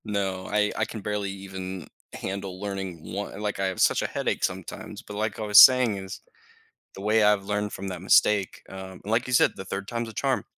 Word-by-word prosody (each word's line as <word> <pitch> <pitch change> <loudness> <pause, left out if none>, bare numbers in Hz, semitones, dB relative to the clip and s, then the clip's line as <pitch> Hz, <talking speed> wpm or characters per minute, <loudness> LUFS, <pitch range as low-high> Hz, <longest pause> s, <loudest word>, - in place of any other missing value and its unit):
No, 95 -3 -2
I 105 0 +1
I 110 - 0
can 110 -1 -7
barely 105 0 -2
even 95 -2 -7 0.3
handle 95 -1 -5
learning 95 -5 -5
one 100 +1 -5
like, 105 -1 -3
I 95 - +1
have 95 - -4
such - - +3
a - - -1
headache - - -2
sometimes, - - -4
but, 105 - -10
like 110 +1 -2
I - - -3
was 105 -1 +7
saying 125 -5 +8
is 95 -1 -8 0.7
the - - -9
way 110 +2 +3
I've 105 -2 +3
learned 105 +1 -2
from 95 +1 -5
that 95 - -6
mistake, 100 -3 +3
um, 95 -1 -9
and 105 - -6
like 115 +2 +1
you 125 - -5
said, 125 - +5
the 95 - -7
third 100 +1 -5
time's 115 -1 -3
a - - -8
charm. - - -1
100 Hz, 220 wpm, -26 LUFS, 95-105 Hz, 0.7 s, saying